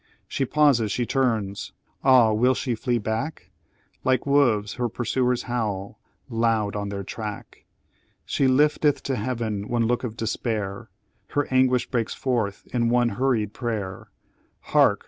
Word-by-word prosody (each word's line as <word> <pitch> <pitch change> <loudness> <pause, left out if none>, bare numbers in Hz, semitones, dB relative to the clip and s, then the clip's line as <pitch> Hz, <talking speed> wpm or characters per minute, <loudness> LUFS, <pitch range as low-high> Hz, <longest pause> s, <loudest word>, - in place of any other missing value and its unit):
"She 135 - -1
pauses, 135 -7 +3
she 120 - 0
turns! 115 -7 -1 0.3
Ah, 125 -5 +6
will 125 +4 +3
she 125 -1 -1
flee 120 +2 0
back? 110 +8 -4 0.5
Like 130 -1 +2
wolves, 120 -8 +3
her 120 -1 -2
pursuers 125 +2 0
howl 110 -5 -3 0.3
loud 115 -4 0
on 100 -1 -3
their 100 -1 -4
track; 105 +1 -7 0.6
She 135 - +1
lifteth 145 +2 +3
to 135 - -1
Heaven 110 -3 -3
one 120 -1 +1
look 120 +2 0
of 115 -2 -5
despair 110 -2 -3 0.4
Her 145 - 0
anguish 130 -1 +3
breaks 115 -3 -1
forth 115 -6 -1
in 120 -2 +2
one 120 0 +3
hurried 115 -3 0
prayer 105 -6 -4 0.5
Hark! - - +3
120 Hz, 140 wpm, -24 LUFS, 105-130 Hz, 0.6 s, Ah